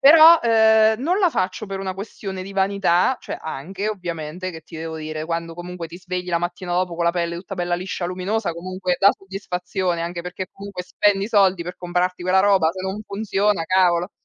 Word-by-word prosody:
Però, 320 +3 +9
uhm, 220 0 +5
non 355 +7 +1
la 375 -4 +4
faccio 185 +1 -2
per 195 -1 -5
una 190 -1 -3
questione 195 -1 -6
di 195 - -8
vanità, 195 +3 +2
cioè - - -6
anche 185 +7 -4
ovviamente: 175 -2 -4
che 160 - -9
ti 165 - -11
devo 160 0 -5
dire 155 0 -5
quando 165 0 -3
comunque 175 -1 -7
ti 170 +2 -10
svegli 180 0 -5
la 170 - +1
mattina 175 +1 -4
dopo 180 -1 0
con 170 - -2
la 170 - +4
pelle 170 -1 -2
tutta 190 +2 -7
bella 175 0 0
liscia 180 0 -4
luminosa 185 +2 -2
comunque 185 +1 -3
dà 200 - +7
soddisfazione, 185 -2 -3
anche 170 +1 -4
perché 180 +1 -6
comunque 200 -2 -7
spendi 200 +2 +1
soldi 195 -5 +3
per 180 - -6
comprarti 180 0 -1
quella 185 +1 +3
roba 195 -5 +4
se 185 - -7
non 190 +3 -4
funziona 200 -3 0
cavolo. 180 0 +2
185 Hz, 200 wpm, -22 LUFS, 175-200 Hz, -, Però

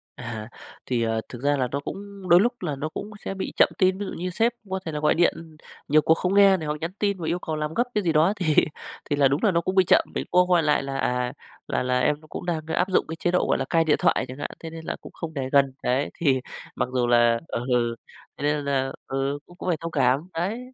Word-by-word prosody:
À, 115 -2 -6 0.4
thì, 125 -2 0
ờ, 115 0 0
thực 120 - -9
ra 145 +1 +2
là 130 - +1
nó 140 - -1
cũng 195 +4 -8
đôi 175 +1 +8
lúc 240 +5 +2
là 155 -6 -2
nó 150 +3 -4
cũng 205 - -6 0.2
sẽ - - -2
bị 190 - -5
chậm - - +6
tin, 185 0 +3
ví 205 - -3
dụ - - -6
như 180 +2 -3
sếp 225 +6 +1 0.2
có 190 0 -2
thể 160 - -3
là 150 - -3
gọi 150 - +3
điện 165 -2 0 0.3
nhiều 155 +1 +5
cuộc 160 - +4
không 180 +3 -1
nghe 200 -1 +6
này 160 -3 -5
hoặc 150 - -1
nhắn 165 +2 -2
tin 200 -2 +1
và 165 - -4
yêu 170 +2 0
cầu 160 -3 -4
làm 150 0 -3
gấp 240 - +2
cái 210 - +1
gì 170 - +2
đó 160 +6 +4
thì 160 -7 0 0.5
thì 145 - +2
là 140 -1 +4
đúng 140 +3 -1
là 210 - +4
nó 170 -1 +2
cũng 185 +2 -2
bị 190 - +6
chậm, - - +6
mình - - -2
cũng 180 - +5
có 180 - +3
gọi 170 -2 +4
lại 150 -2 +2
là 135 0 -4
"À, 125 -1 -1 0.3
là - - -1
là 125 0 +1
em 150 +3 +1
nó 155 - -17
cũng - - -7
đang 165 -3 -2
áp 180 +3 0
dụng 185 - +2
cái 160 - -5
chế 175 +2 -1
độ, 180 - +2
gọi - - +2
là, - - -2
cai 165 -1 +3
điện 155 -2 +3
thoại", - - +2
chẳng 130 +1 -8
hạn, - - -4
"thế 165 - -7
nên 160 0 -9
là - - -3
cũng - - -11
không 165 -2 -6
để 135 -3 -3
gần." 140 -2 +4
Đấy, 130 +3 +1
thì 135 -6 +2 0.3
mặc - - -1
dù 125 -2 +1
là 120 -1 +4
ừ, 120 -1 0 0.4
thế - - -7
nên 145 0 0
là 135 -1 0 0.2
ừ, 135 +1 -1
cũng 175 - -17
cũng 185 - -4
phải 170 - +1
thông 165 0 -4
cảm, 135 +2 +2
đấy. 185 +8 -2
155 Hz, 285 wpm, -25 LUFS, 135-180 Hz, 0.5 s, đôi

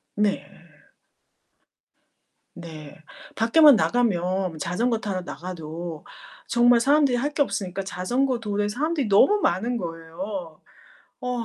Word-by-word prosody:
네. 205 -1 0 2.1
네. 160 -4 -10 0.4
밖에만 275 +4 +6
나가면 185 -7 0
자전거 225 +9 -1
타러 195 -4 -3
나가도 170 -2 -7 0.4
정말 240 0 +4
사람들이 280 -1 +3
할 285 +5 -2
게 290 - +3
없으니까 195 -6 -3
자전거 245 +8 -1
도로에 205 -2 -2
사람들이 285 +3 -1
너무 205 - +5
많은 230 +8 0
거예요. 165 0 -6 0.6
어. 250 -2 -3
205 Hz, 240 characters per minute, -24 LUFS, 175-245 Hz, 2.1 s, 밖에만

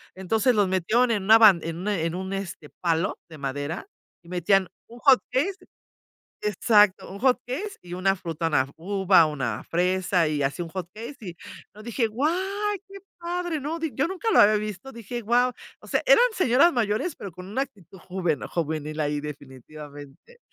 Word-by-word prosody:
Entonces, 220 +6 +1
los 205 -2 +3
metieron 215 +7 +2
en 205 -3 0
una 220 +3 +7
ban 210 -6 +7
en 165 0 -4
un 190 - -5
en 165 -4 -1
un, 190 +1 -4
este, 190 -6 -6
palo 170 0 0
de 160 - -11
madera 145 - -4 0.4
y 170 - -17
metían 180 +2 +2 0.2
un 235 +1 -13
hot 270 -2 +6
cake 290 +10 0 0.9
exacto. 210 -1 +3
Un 200 - -8
hot 255 +1 +3
cake 375 +12 -5
y 175 0 -10
una 195 +2 +1
fruta, 165 -2 -3
una 150 -5 +3
f 135 - -13
uva, 190 0 +4
una 135 -8 -3
fresa 180 0 +1
y 150 -2 -1
así 140 +5 -1
un 165 - -9
hot 180 0 -5
cake, 235 +6 -8
y 180 -5 -7 0.4
no, 215 - -12
dije: 235 +1 0
"Guau, 250 +8 0 0.6
qué 395 - -10 0.2
padre". 345 -1 -3
No 315 +4 -3
di 320 -2 -2
yo 275 - +1
nunca 380 +5 -3
lo - - +5
había 215 +1 +6
visto, 210 +3 -4
dije: 235 0 -6
"guau". 240 +3 +2 0.3
O - - -15
sea, - - +1
eran - - +7
señoras 335 - +4
mayores, 230 - -1
pero 200 - -8
con 180 +2 -11
una 230 +7 -2
actitud 200 - -16
juven 175 -5 -2
juvenil 155 -2 -3
ahí, 150 -1 -1
definitivamente. 145 - -11
195 Hz, 185 wpm, -25 LUFS, 165-245 Hz, 0.9 s, una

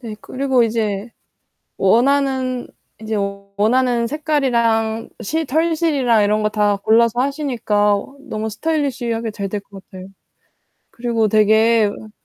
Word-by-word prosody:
네. 225 -4 -7
그리고 265 -2 0
이제 220 -1 -1 0.7
원하는, 255 +3 +1 0.3
인제 220 0 -4 0.4
원하는 240 +2 +2
색깔이랑 235 -7 0
시 320 +8 -2
털실이랑 300 -6 +1
이런 210 +1 +1
거 215 - +2
다 210 -1 +1
골라서 230 +3 +2
하시니까 245 -7 +1 0.3
너무 220 -6 -4
스타일리시하게 240 -4 -2
잘 200 -2 -5
될 205 0 -4
것 195 -1 -14
같아요. 185 -1 -11 0.8
그리고 230 -2 -1
되게 220 +1 +4
으 215 +1 -7
230 Hz, 270 characters per minute, -19 LUFS, 215-265 Hz, 0.8 s, 되게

